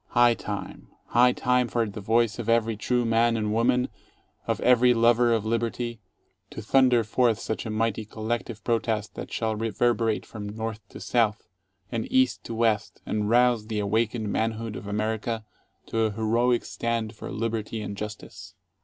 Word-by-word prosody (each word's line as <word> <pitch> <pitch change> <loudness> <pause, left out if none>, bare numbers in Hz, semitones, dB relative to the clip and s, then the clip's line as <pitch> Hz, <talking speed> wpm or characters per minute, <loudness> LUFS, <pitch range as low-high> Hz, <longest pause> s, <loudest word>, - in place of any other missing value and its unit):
High 120 0 +6
time, 105 -3 -6 0.2
high 125 +1 +5
time 125 0 +1
for 120 -1 0
the 105 +1 -7
voice 115 +2 +1
of 115 -1 -3
every 115 -1 +2
true 120 +3 0
man 115 0 +3
and 105 -1 -1
woman, 125 +3 +2 0.6
of - - 0
every 125 0 +5
lover 120 +1 +4
of 110 -2 +1
liberty, 115 +1 -2 0.5
to - - -8
thunder 125 +1 +4
forth 115 +1 +2
such 110 +2 -4
a - - -4
mighty 110 0 -1
collective 110 0 -4
protest 110 -2 -1
that - - -7
shall 110 -1 -1
reverberate 115 +1 0
from 105 -2 -7
North 110 +1 -4
to - - -10
South, 110 +1 0 0.4
and 115 -2 -3
East 260 0 +2
to 115 - -5
West, 110 -2 0
and 105 -1 -1
rouse 120 -2 +3
the 110 -1 -3
awakened 110 +1 0
manhood 110 -1 -2
of 100 - -7
America 110 +2 -2 0.4
to 115 - -3
a 110 -1 +2
heroic 115 +3 +1
stand 115 -1 -2
for - - -8
Liberty 110 0 -3
and 100 0 -5
Justice. 100 -2 -8
115 Hz, 165 wpm, -26 LUFS, 110-120 Hz, 0.6 s, High